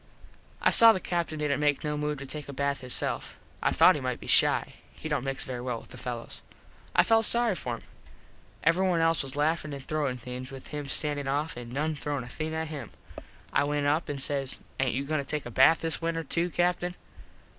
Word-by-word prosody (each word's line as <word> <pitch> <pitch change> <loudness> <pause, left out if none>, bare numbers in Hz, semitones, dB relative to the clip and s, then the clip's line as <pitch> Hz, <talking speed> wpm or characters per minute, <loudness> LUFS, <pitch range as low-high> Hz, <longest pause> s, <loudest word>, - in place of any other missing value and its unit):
I - - +5
saw 230 -1 +9
the 190 - -2
Captin 170 -3 -2
didnt 150 -2 0
make 145 0 +2
no 150 -1 -1
move 150 0 -2
to 140 - -7
take 150 +1 -7
a - - -6
bath 140 0 -1
hisself. 125 -1 -1 0.2
I - - +2
thought - - +7
he - - -4
might - - -2
be - - -10
shy. - - +4 0.2
He - - -7
dont 150 -4 -1
mix 135 0 -2
very 125 -2 -5
well 125 -2 -3
with - - -16
the - - -10
fellos. 120 -3 -6 0.5
I - - +7
felt 225 0 +4
sorry 235 -1 +3
for 125 -9 -3
him. - - -12 0.8
Everyone 175 +2 +3
else 165 0 +3
was 135 -1 -5
laffin 155 0 0
an 140 - -6
throwin 145 -3 -2
things 125 +1 -7
with 135 -1 -10
him 145 -2 -5
standin 145 0 0
off 145 +4 -1
an 120 -1 -8
noone 150 +4 -1
throwin 145 -2 -3
a 120 - -10
thing 155 +5 -4
at 160 -1 -3
him. 140 -7 -6 0.6
I - - +3
went 145 0 0
up 150 +4 +1
an 145 - -2
says 135 -1 -1 0.2
"Aint 130 -2 +1
you 135 +2 -2
goin 155 +1 0
to - - -2
take 150 +2 -4
a 120 - -6
bath 135 +7 +5
this 165 +1 -2
winter 165 0 -1
to, 170 +4 0
Captin?" 175 +1 0
145 Hz, 225 wpm, -28 LUFS, 135-160 Hz, 0.8 s, saw